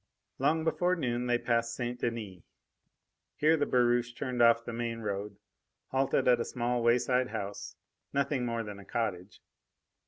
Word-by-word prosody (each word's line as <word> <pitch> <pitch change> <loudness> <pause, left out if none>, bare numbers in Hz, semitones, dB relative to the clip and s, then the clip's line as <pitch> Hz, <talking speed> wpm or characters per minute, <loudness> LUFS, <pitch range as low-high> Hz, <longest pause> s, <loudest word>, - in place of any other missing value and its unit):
Long 155 +4 +2
before 175 +3 +1
noon 125 -6 -1
they 120 0 +3
passed 115 -1 0
St. 120 0 -3
Denis. 110 -7 -4 0.9
Here 155 +2 +4
the 145 -2 0
barouche 120 -1 +2
turned 125 -3 -2
off 115 0 +5
the 120 - -5
main 115 0 -3
road, 100 -1 -4 0.5
halted 135 0 +1
at 125 -1 +5
a - - +1
small 120 -1 -1
wayside 125 +2 +3
house 100 -2 -5 0.4
nothing 140 -2 0
more 115 -1 -1
than 105 -2 -8
a - - -11
cottage. 100 -4 -3
120 Hz, 155 wpm, -30 LUFS, 115-125 Hz, 0.9 s, off